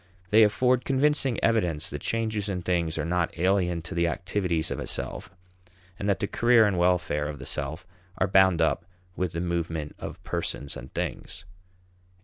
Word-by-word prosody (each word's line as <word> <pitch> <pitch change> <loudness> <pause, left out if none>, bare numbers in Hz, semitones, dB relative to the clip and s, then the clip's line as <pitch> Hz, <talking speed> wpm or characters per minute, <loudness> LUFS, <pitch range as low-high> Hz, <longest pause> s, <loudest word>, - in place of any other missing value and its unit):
They 110 +2 +7
afford 125 +4 +3
convincing 135 -2 +1
evidence 90 -9 +1
that 75 - -5
changes 110 -2 -1
in 90 -2 -3
things 85 -2 0
are 75 - -1
not 85 0 -1
alien 90 -2 +1
to 85 - -6
the 85 -1 +1
activities 90 -3 -1
of - - -3
a - - -5
self, 90 - -2 0.7
and 100 - -1
that 100 - +2
the - - 0
career 120 0 +4
and 95 -4 +1
welfare 85 -4 +1
of 75 -1 -5
the - - -9
self 80 +6 -3 0.3
are - - +2
bound 95 -3 +4
up 80 - +1 0.3
with 90 -2 -2
the 85 - -2
movement 85 -3 -3
of - - -8
persons 70 - -3
and 65 +1 -9
things. - - -4
90 Hz, 175 wpm, -27 LUFS, 85-105 Hz, 0.7 s, They